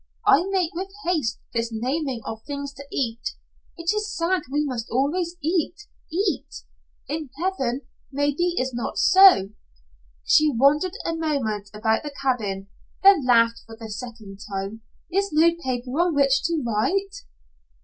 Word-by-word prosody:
I 345 +7 +5
make 370 -4 0
with 375 +3 -4 0.2
haste 310 -10 0 0.2
this 230 -1 -1
naming 255 +2 -2
of 220 0 -6
things 280 -1 -5
to 280 0 -11
eat. 245 - -2 0.4
It 335 +1 0
is 425 0 -3
sad 350 +2 +1
we 295 +1 +1
must 245 -5 -4
always 330 +8 0
eat 335 +2 0 0.4
eat. 365 -2 0 0.6
In 300 0 -4
heaven 275 -9 -1 0.3
maybe 290 +5 0
is 255 0 -1
not 240 - -4
so." 370 - +7 0.7
She 305 0 +5
wandered 285 +8 +3
a 330 - 0
moment 250 -11 -2
about 220 +1 0
the 295 -2 -7
cabin, 210 -8 -1 0.4
then 385 -9 +6
laughed 230 -1 +4
for 225 0 -11
the 220 -2 -8
second 210 -3 -8
time. 195 +3 -4 0.3
"Is 395 +1 0
no 320 +2 +5
paper 250 -1 -3
on 345 -2 +2
which 275 -1 +3
to 325 -3 0
write." 390 - 0
280 Hz, 150 wpm, -24 LUFS, 230-335 Hz, 0.7 s, so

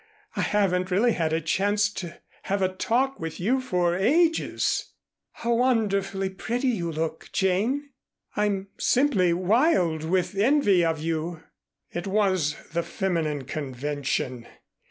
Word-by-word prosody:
I - - 0
haven't 185 -3 +1
really 210 +6 +3
had 165 -6 0
a 160 - +1
chance 205 +6 +1
to 170 -3 -7 0.3
have 195 0 +1
a 185 0 0
talk 260 +7 0
with 165 -1 -5
you 245 +9 +1
for 180 -8 +1
ages." 320 - +1 0.4
"How 235 0 -1
wonderfully 200 -6 +1
pretty 240 +7 -1
you 175 -8 -1
look, 160 0 -4
Jane? 225 +10 0 0.4
I'm 200 -2 0
simply 240 -10 +3
wild 185 - +2
with 180 +2 0
envy 205 -4 +3
of 165 -2 0
you." 165 +1 -3 0.5
It 175 +2 -4
was 190 -7 +1
the 170 0 -1
feminine 165 -6 -2
convention. 135 -2 -3
190 Hz, 130 wpm, -26 LUFS, 165-220 Hz, 0.5 s, really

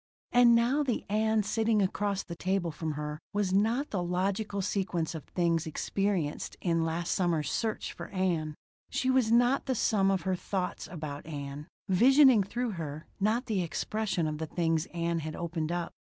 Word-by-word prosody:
And 240 -1 +6
now 240 +5 +3
the 260 -6 -1
Ann 220 0 +2
sitting 220 +1 +1
across 200 0 0
the 170 - -7
table 185 -1 -1
from 155 0 -3
her 150 0 -4
was 200 -2 0
not 225 +8 +1
the 195 - -1
logical 195 +4 -1
sequence 180 -5 -1
of 160 -3 -7
things 170 -2 0
experienced 180 -1 -2
in 165 -2 +1
last 165 +1 -2
summer's 165 -6 +1
search 220 -2 -2
for - - -8
Ann. 170 -6 -1 0.3
She 260 - +1
was 255 -4 +3
not 245 +4 +3
the 260 - +1
sum 200 -3 +2
of 190 -3 +1
her 185 0 0
thoughts 185 0 -3
about 155 -4 -6
Ann 145 -1 -6 0.2
visioning 255 +4 +6
through 240 +5 -2
her, 155 -4 -6
not 220 +5 +1
the 210 -6 0
expression 190 +1 -1
of 155 -1 -3
the 160 - -3
things 165 -1 0
Ann 170 -1 -1
had 155 0 -5
opened 165 -1 -3
up. 175 -1 -2
185 Hz, 175 wpm, -30 LUFS, 165-220 Hz, 0.3 s, And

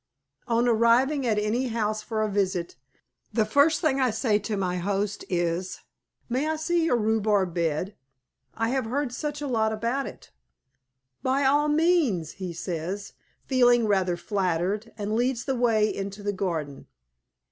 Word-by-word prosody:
On 235 +1 +2
arriving 245 +4 +3
at 215 -2 +2
any 220 +5 0
house 215 -2 -1
for 215 0 -2
a - - +1
visit, 185 -3 -1 0.6
the 220 -2 +2
first 285 +8 +3
thing 275 -5 +2
I 255 - +3
say 220 -1 +1
to 210 0 -3
my 180 -2 -1
host 200 +2 -2
is, 175 +1 -1 0.5
"May 260 +6 -1
I 315 - 0
see 330 +2 0
your 250 -7 +2
rhubarb 210 -4 +1
bed? 170 +3 -1 0.6
I 225 0 0
have 265 -1 0
heard 265 +3 -2
such 295 +3 -4
a - - -2
lot 220 -4 +1
about 235 +5 -1
it." - - -12 0.9
"By 265 +2 +1
all 290 +2 +3
means," 300 - +2
he 185 -2 -3
says, 175 +4 -5 0.3
feeling 245 -3 +4
rather 190 -4 +1
flattered, 195 +3 -1
and 210 0 -3
leads 240 +1 0
the 270 - 0
way 225 -3 +2
into 200 +1 -6
the 205 0 -1
garden. 165 -8 -3
220 Hz, 160 wpm, -26 LUFS, 195-255 Hz, 0.9 s, feeling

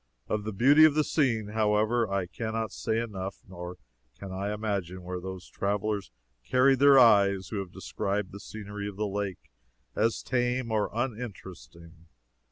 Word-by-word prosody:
Of 105 -1 -2
the 110 - -2
beauty 135 +9 +6
of 155 -2 +6
the 155 - +3
scene, 115 -10 0
however, 110 +1 +1
I 100 -2 0
can 110 +5 -5
not 110 -3 -2
say 110 0 -2
enough, 100 -4 -4
nor 90 -1 -8 0.4
can 100 -1 -8
I 100 +2 -3
imagine 100 -4 -3
where 90 0 -4
those 95 -1 -7
travelers 100 - -2 0.3
carried 130 - +3
their 140 0 +7
eyes 100 -6 +5
who 110 - -4
have 95 -2 -6
described 100 -1 -3
the 100 - -9
scenery 105 -1 -7
of 100 - -7
the 105 - 0
lake 100 -8 -4 0.4
as 115 0 +1
tame 125 -1 0
or 105 -2 +1
uninteresting. 85 - -7
105 Hz, 165 wpm, -28 LUFS, 95-115 Hz, 0.4 s, their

